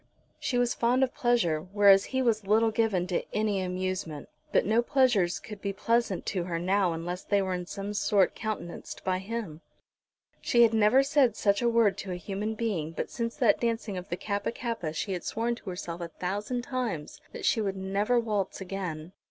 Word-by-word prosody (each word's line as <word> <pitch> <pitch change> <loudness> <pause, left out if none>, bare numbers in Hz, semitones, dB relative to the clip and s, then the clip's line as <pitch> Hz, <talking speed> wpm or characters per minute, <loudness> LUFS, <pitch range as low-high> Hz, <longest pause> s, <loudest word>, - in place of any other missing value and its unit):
She 255 -4 -1
was 245 -1 +2
fond 245 +3 +2
of 260 - 0
pleasure, 230 -11 +1
whereas 195 +2 +5
he 260 0 -1
was 220 -4 +1
little 220 +2 +4
given 215 -5 +1
to 180 -1 -1
any 210 -2 +1
amusement; 185 -4 -3 0.2
but - - +3
no 220 +3 +3
pleasures 240 -9 +2
could 210 -3 -10
be 200 -1 -2
pleasant 230 -1 0
to 180 -3 -2
her 170 -2 -2
now 185 +1 +1
unless 175 +3 -4
they 205 - +2
were 190 -1 -1
in 180 -1 -4
some 200 +1 -5
sort 200 -2 +2
countenanced 215 -6 -6
by 185 -1 0
him. 195 -6 -5 0.8
She 235 -1 +4
had 230 -1 +4
never 220 +5 +5
said 275 -5 +3
such 200 0 +2
a 240 - +3
word 225 -4 +3
to 190 - -5
a - - -2
human 205 +4 -4
being, 190 -9 -2
but - - -4
since 230 -1 -3
that - - +3
dancing 230 -3 -1
of 180 +2 -6
the 175 - -2
Kappa 205 +2 -2
kappa 230 -9 -3
she 165 +5 -3
had 180 - -4
sworn 230 +2 -1
to 230 -4 -8
herself 175 -2 -5
a 170 - -3
thousand 205 +8 -3
times 245 - -4
that - - -6
she 225 - +3
would 195 -2 -2
never 200 +5 +1
waltz 210 -4 -2
again. 180 -4 -5
205 Hz, 200 wpm, -28 LUFS, 185-230 Hz, 0.8 s, whereas